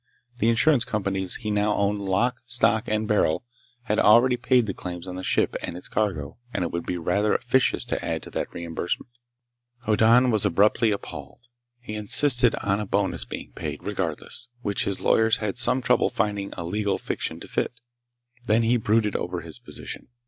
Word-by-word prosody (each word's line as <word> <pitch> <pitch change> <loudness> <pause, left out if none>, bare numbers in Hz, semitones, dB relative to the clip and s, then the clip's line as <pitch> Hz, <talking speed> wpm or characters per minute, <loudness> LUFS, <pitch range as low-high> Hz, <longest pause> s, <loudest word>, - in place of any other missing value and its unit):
The 115 - +3
insurance 125 +2 +4
companies 95 -4 -2
he 110 -2 -4
now 105 0 +1
owned 100 +1 0
lock, 110 +6 0
stock, 115 -2 +3
and 110 0 -1
barrel 105 -2 +1 0.4
had 105 -3 0
already 120 +4 +6
paid 125 0 +2
the 100 - -3
claims 90 0 -7
on 90 - -6
the 95 - -5
ship - - +1
and 85 - -5
its 90 - -8
cargo, 80 -6 -2
and - - -1
it 85 - -3
would 85 0 -4
be 90 - -2
rather 100 +5 +1
officious 125 +1 +1
to - - -3
add - - -3
to - - -10
that - - -3
reimbursement. 85 +6 -4 0.7
Hoddan 115 +4 +4
was 110 -2 +2
abruptly 105 +4 +3
appalled. 95 - -6 0.3
He 120 -3 -8
insisted 120 +3 +3
on 100 +1 +1
a 105 - -4
bonus 100 0 0
being - - -8
paid, - - -6
regardless, 120 - -3 0.2
which 100 -1 0
his 100 -1 -2
lawyers 110 0 +3
had 105 +2 -2
some 125 +1 +2
trouble 125 -1 +3
finding 100 -1 -2
a 85 - -6
legal 100 +3 -1
fiction - - -4
to - - -9
fit. - - -1 0.8
Then 110 +2 +3
he 120 +2 +3
brooded 110 -1 +1
over - - -3
his - - -9
position. - - -5
105 Hz, 185 wpm, -25 LUFS, 95-115 Hz, 0.8 s, already